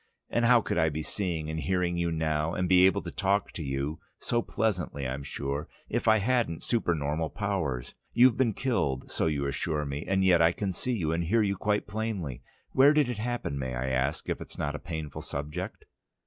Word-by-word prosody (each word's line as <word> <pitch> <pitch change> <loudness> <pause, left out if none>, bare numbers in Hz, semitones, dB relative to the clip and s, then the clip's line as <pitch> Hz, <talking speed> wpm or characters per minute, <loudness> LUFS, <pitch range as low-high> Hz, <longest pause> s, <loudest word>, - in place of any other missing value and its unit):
And 120 0 +2
how 120 -1 +6
could 90 - -1
I 80 -2 +4
be 80 +1 -3
seeing 85 -4 -1
and 80 0 -3
hearing 90 0 0
you 85 -1 0
now, 80 0 0
and 90 - 0
be 90 +1 +7
able 95 - +1
to - - -5
talk 100 0 0
to - - -6
you 70 +2 -2 0.2
so 120 -1 0
pleasantly, 90 - -1
I'm 65 +2 -3
sure 70 +2 -3 0.2
if - - -1
I 110 0 +7
hadn't 115 -6 0
super 110 -8 +1
normal 75 +2 -1
powers? 90 - -2 0.2
You've 120 0 +6
been 115 -6 +1
killed, 70 - -1
so - - +1
you 70 -3 0
assure 75 +2 -1
me, 70 +2 -4
and 95 0 +2
yet 90 -3 +5
I 85 +1 +5
can 100 -1 -2
see 115 0 -1
and 80 +2 0
hear 110 +6 +3
you 100 -1 +1
quite 105 +2 0
plainly. 100 - -3 0.3
Where 140 +3 +6
did 150 -4 +3
it 120 -4 -3
happen, 120 - -2
may 65 -1 -3
I 65 +2 -2
ask, 65 +4 -1
if - - -2
it's - - -7
not 75 0 -1
a 75 - -5
painful 80 -4 -5
subject?" 75 +1 -5
85 Hz, 210 wpm, -29 LUFS, 75-105 Hz, 0.3 s, be